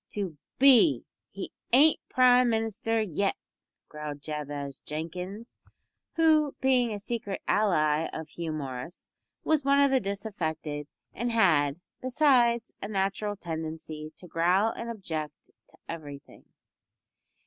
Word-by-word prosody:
"To 195 -6 -3 0.2
be 275 +2 +6 0.2
he - - -7 0.2
ain't 290 +6 +6
Prime 250 -1 +5
Minister 225 0 0
yet," 195 +1 -1 0.5
growled 150 -1 -7
Jabez 145 -2 -5
Jenkins, 180 +8 -6 0.6
who, 310 -3 +3
being 255 -3 +3
a 210 - -3
secret 205 -1 -4
ally 160 -7 +2
of 160 0 -6
Hugh 165 0 -5
Morris, 140 +2 -6 0.3
was 310 -3 +2
one 280 +1 +4
of 280 -1 +4
the 265 - +4
disaffected, 160 - -4 0.3
and 240 +1 -2
had, 160 -9 +3 0.2
besides, 250 -3 +3
a - - -4
natural 200 +1 -1
tendency 160 -3 -6
to - - -11
growl 180 +6 +2
and 235 +1 -6
object 160 -9 -6 0.2
to - - -19
everything. 145 -4 -9
195 Hz, 120 wpm, -28 LUFS, 155-235 Hz, 0.6 s, be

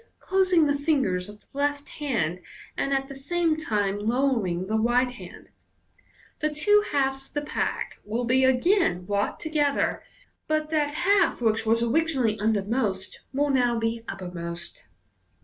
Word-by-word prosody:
closing 370 -4 +3
the 285 -1 +2
fingers 265 - 0
of 210 0 -12
the - - -17
left 290 0 0
hand, 205 - -1 0.4
and 275 - -1
at 270 0 0
the 275 - -8
same 325 +4 0
time 205 -9 -1
lowering 220 -6 0
the 215 +3 -2
right 240 +3 +2
hand), - - -12 0.9
the 305 0 0
two 415 +8 +3
halves 270 -1 0
of - - -27
the 290 - 0
pack 295 - -3
will 230 +4 -2
be 255 +2 +3
again 260 - +2
brought 200 +1 -1
together, 295 -3 0 0.5
but 310 0 -1
that 295 -2 0
half 390 +5 +3
which 225 -1 +1
was 230 +1 +3
originally 255 -4 +1
undermost 210 -1 0
will 285 +2 +1
now 245 -3 +2
be 225 0 -1
uppermost. 170 - -6
260 Hz, 150 wpm, -26 LUFS, 215-295 Hz, 0.9 s, closing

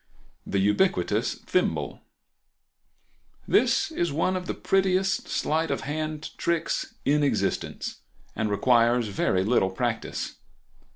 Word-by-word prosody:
The 100 - -1
Ubiquitous 105 - +2 2.1
Thimble.—This - - +3
is 175 - -1
one 165 +6 +1
of 180 -1 -4
the - - -2
prettiest 190 0 +1
sleight 160 +1 0
of 140 - -1
hand 155 +2 -4
tricks 170 -1 -1
in 150 +2 +3
existence, 145 - -1 0.4
and 110 -1 -1
requires 120 +1 +3
very 95 -1 +1
little 100 -3 +2
practice. 110 +3 -3
145 Hz, 105 wpm, -26 LUFS, 110-170 Hz, 2.1 s, Thimble.—This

